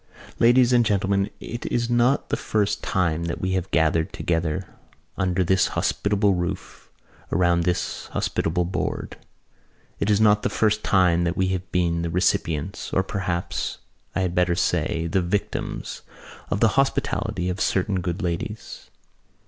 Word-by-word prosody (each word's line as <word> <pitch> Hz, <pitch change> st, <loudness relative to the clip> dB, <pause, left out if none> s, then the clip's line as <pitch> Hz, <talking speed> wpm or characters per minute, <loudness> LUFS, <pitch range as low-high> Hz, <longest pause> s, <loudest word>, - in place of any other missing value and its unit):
"Ladies 125 Hz, +1 st, +5 dB
and 120 Hz, -1 st, +5 dB
Gentlemen, 100 Hz, -2 st, +1 dB
it 120 Hz, +2 st, -6 dB
is 120 Hz, -1 st, 0 dB
not 120 Hz, +3 st, +2 dB
the -, -, +1 dB
first 110 Hz, -7 st, -1 dB
time 85 Hz, -3 st, 0 dB
that 85 Hz, -, -3 dB
we 95 Hz, -, -1 dB
have 95 Hz, 0 st, -1 dB
gathered 80 Hz, +2 st, +2 dB
together 85 Hz, +1 st, -1 dB, 0.5 s
under 95 Hz, 0 st, +1 dB
this 95 Hz, +1 st, +3 dB
hospitable 100 Hz, 0 st, +2 dB
roof, 90 Hz, -1 st, -5 dB, 0.4 s
around 85 Hz, -1 st, +2 dB
this 90 Hz, 0 st, -2 dB
hospitable 85 Hz, +2 st, -1 dB
board. 90 Hz, -, -3 dB, 0.8 s
It 100 Hz, -, 0 dB
is 105 Hz, -1 st, +4 dB
not 105 Hz, -1 st, +5 dB
the -, -, 0 dB
first 105 Hz, -1 st, +1 dB
time 90 Hz, -3 st, +3 dB
that 85 Hz, +1 st, -1 dB
we 95 Hz, 0 st, +2 dB
have 95 Hz, -1 st, -3 dB
been 85 Hz, -2 st, +1 dB
the 85 Hz, -, -2 dB
recipients—or 90 Hz, +1 st, 0 dB
perhaps, 90 Hz, -3 st, -3 dB, 0.4 s
I -, -, +1 dB
had 90 Hz, -2 st, -1 dB
better 90 Hz, -1 st, +2 dB
say, 80 Hz, -1 st, 0 dB
the 90 Hz, +3 st, +1 dB
victims—of 100 Hz, +2 st, -4 dB
the 115 Hz, -, +5 dB
hospitality 115 Hz, -8 st, 0 dB
of 90 Hz, +4 st, -2 dB
certain 95 Hz, -2 st, +1 dB
good 90 Hz, +2 st, -3 dB
ladies." 90 Hz, +5 st, -5 dB
95 Hz, 145 wpm, -24 LUFS, 85-105 Hz, 0.8 s, Ladies